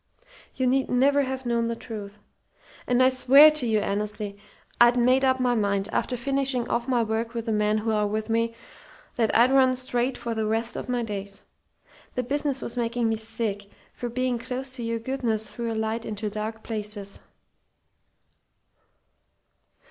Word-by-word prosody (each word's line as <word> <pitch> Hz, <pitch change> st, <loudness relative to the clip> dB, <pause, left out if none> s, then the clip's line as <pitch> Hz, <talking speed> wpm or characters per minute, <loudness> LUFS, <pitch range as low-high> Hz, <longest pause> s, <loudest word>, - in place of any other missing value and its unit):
You 260 Hz, -, 0 dB
need 265 Hz, +1 st, +2 dB
never 275 Hz, +3 st, +3 dB
have 265 Hz, -1 st, -3 dB
known 235 Hz, -1 st, +1 dB
the 230 Hz, -, -2 dB
truth. 210 Hz, -3 st, -8 dB, 0.7 s
And 250 Hz, +1 st, +4 dB
I 255 Hz, -, +6 dB
swear 270 Hz, +4 st, +7 dB
to 305 Hz, -5 st, -2 dB
you, 220 Hz, -1 st, +2 dB
Annesley, 210 Hz, 0 st, -2 dB, 0.4 s
I'd 240 Hz, +1 st, +6 dB
made 255 Hz, +2 st, +4 dB
up 260 Hz, -1 st, +3 dB
my 250 Hz, -1 st, +2 dB
mind, 200 Hz, -2 st, 0 dB
after 250 Hz, -, -1 dB
finishing 270 Hz, -1 st, -1 dB
off 235 Hz, -, -1 dB
my 245 Hz, -3 st, +2 dB
work 225 Hz, +1 st, -2 dB
with 230 Hz, -1 st, -3 dB
the 225 Hz, -, -1 dB
men 210 Hz, 0 st, +2 dB
who 220 Hz, +1 st, -1 dB
are 210 Hz, -1 st, +1 dB
with 215 Hz, +1 st, -2 dB
me, 230 Hz, 0 st, 0 dB, 0.6 s
that 225 Hz, -3 st, +2 dB
I'd 240 Hz, +3 st, +5 dB
run 260 Hz, -1 st, +4 dB
straight 250 Hz, 0 st, -1 dB
for 235 Hz, -, -4 dB
the 220 Hz, -1 st, -1 dB
rest 225 Hz, +2 st, -1 dB
of -, -, -6 dB
my 245 Hz, -1 st, 0 dB
days. 200 Hz, -2 st, -5 dB, 0.7 s
The 250 Hz, -, 0 dB
business 280 Hz, +1 st, -1 dB
was 235 Hz, -, -4 dB
making 235 Hz, -1 st, 0 dB
me 225 Hz, -, +1 dB
sick, 220 Hz, -2 st, -4 dB, 0.3 s
for 240 Hz, -, -5 dB
being 250 Hz, 0 st, -1 dB
close 260 Hz, +3 st, -5 dB
to 250 Hz, -, -6 dB
your 230 Hz, 0 st, -2 dB
goodness 230 Hz, -3 st, -2 dB
threw 235 Hz, -1 st, -3 dB
a -, -, -3 dB
light 220 Hz, +1 st, -2 dB
into 210 Hz, -1 st, -4 dB
dark 215 Hz, +1 st, -5 dB
places. 210 Hz, -2 st, -3 dB
230 Hz, 175 wpm, -26 LUFS, 220-255 Hz, 0.7 s, swear